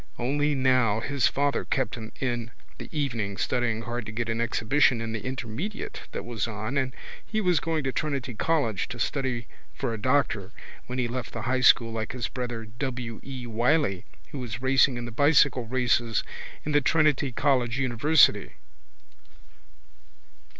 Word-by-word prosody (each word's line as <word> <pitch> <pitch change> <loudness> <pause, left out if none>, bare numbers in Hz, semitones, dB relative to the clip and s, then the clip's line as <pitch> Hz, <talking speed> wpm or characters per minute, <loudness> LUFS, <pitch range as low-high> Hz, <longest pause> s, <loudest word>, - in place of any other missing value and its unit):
Only 145 +4 +1
now 130 -5 +3
his 135 +1 +1
father 140 0 0
kept 130 -4 -1
him 110 -2 -7
in 130 - 0
in 120 -1 -3 0.3
the - - -8
evenings 115 -10 -2
studying 115 -3 0
hard 120 0 -4
to - - -5
get 115 +1 -3
an 115 +1 -1
exhibition 120 +2 +2
in 115 0 -3
the 110 -2 -4
intermediate 130 - -5
that - - -5
was 115 -3 -2
on 110 +4 -4
and 130 -2 0 0.3
he 215 - -2
was 180 -6 +3
going 160 -2 -1
to 135 - 0
go - - -1
to - - -1
Trinity 140 -4 -2
college 115 - 0
to 120 - -7
study 125 -1 -1 0.3
for 130 -4 -2
a 110 - -4
doctor 115 -5 +1 0.3
when 125 - -4
he 125 -2 +1
left 125 0 -5
the 115 - -4
high 130 +2 0
school 115 -2 +5
like 110 -1 -3
his 125 -3 -3
brother 120 -3 -4
W. 120 0 -5
E. 130 -2 -7
Wylie 120 - +1 0.3
who 140 - -5
was 120 -2 -5
racing 130 0 +3
in 120 - -4
the 120 - -6
bicycle 140 -1 +4
races 120 -2 +1 0.4
in 150 - -1
Trinity 145 0 +2
college 125 -2 +1
university. 140 +4 +3
125 Hz, 170 wpm, -27 LUFS, 115-135 Hz, 0.4 s, school